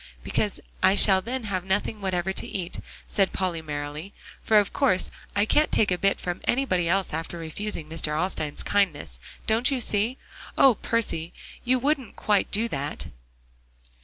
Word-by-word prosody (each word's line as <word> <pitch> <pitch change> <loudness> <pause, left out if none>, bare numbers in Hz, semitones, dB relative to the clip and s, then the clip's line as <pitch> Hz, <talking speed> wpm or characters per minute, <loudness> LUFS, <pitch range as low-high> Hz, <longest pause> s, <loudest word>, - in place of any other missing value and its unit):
"Because - - -1 0.2
I 190 - +5
shall 190 -2 +7
then 250 +4 -4
have 190 -4 -2
nothing 205 +2 -1
whatever 190 -1 -1
to - - -2
eat," 180 -2 -4 0.3
said 195 -2 +1
Polly 180 -3 -1
merrily, 150 +4 -6 0.3
"for 220 - +4
of 205 -1 +2
course 255 -10 +2 0.2
I 205 +1 +3
can't 300 +7 +2
take 210 -3 +2
a 180 - +2
bit 195 0 +2
from 175 0 -4
anybody 185 -10 +1
else 190 -1 0
after 165 +2 -4
refusing 165 +1 -4
Mr. 160 0 -1
Alstyne's 155 -4 -1
kindness. 160 - 0 0.3
Don't 225 +3 +3
you 270 -2 0
see? 225 +2 0 0.4
Oh, 270 - +7
Percy! 205 -8 -1 0.3
you 255 +1 +2
wouldn't 270 -2 -1
quite 205 -2 +1
do 225 +3 +1
that?" 145 -2 -5
195 Hz, 160 wpm, -26 LUFS, 170-220 Hz, 0.4 s, shall